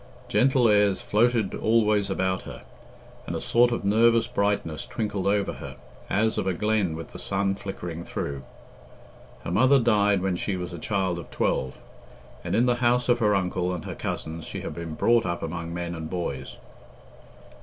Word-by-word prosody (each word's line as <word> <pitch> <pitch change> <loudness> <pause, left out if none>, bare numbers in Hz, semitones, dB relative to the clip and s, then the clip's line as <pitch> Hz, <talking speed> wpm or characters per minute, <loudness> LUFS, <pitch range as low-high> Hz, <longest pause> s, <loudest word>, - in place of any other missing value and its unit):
Gentle 125 0 +3
airs 105 -2 +4
floated 110 -1 +1
always 105 -3 +2
about 95 -1 0
her, - - -10 0.6
and - - -3
a - - -2
sort 120 +1 +3
of 120 - -2
nervous 115 +3 +4
brightness 100 -6 -1
twinkled 105 -4 -2
over 100 0 +1
her, - - -9 0.3
as 110 +2 +1
of - - -2
a 95 - 0
glen 105 -5 0
with 80 0 -8
the - - -9
sun 100 0 0
flickering 90 -4 -6
through. 70 -4 -4 1.0
Her - - -4
mother 130 +9 +5
died 105 -5 +3
when 95 -2 0
she 95 +1 -2
was 90 -1 -5
a 85 - -6
child 95 -3 -1
of 85 - -10
twelve, 65 0 -1 0.7
and 85 +2 -2
in 120 +3 +4
the 120 -1 +2
house 125 +1 +2
of 120 0 +4
her 105 -3 +3
uncle 90 -1 0
and 85 - -7
her - - -5
cousins 80 0 -5
she - - -5
had - - -5
been 85 -2 -6
brought 115 +7 +3
up 85 0 -3
among 85 0 -4
men 85 0 -4
and 80 -2 -6
boys. 75 -7 -4
100 Hz, 180 wpm, -26 LUFS, 85-110 Hz, 1.0 s, mother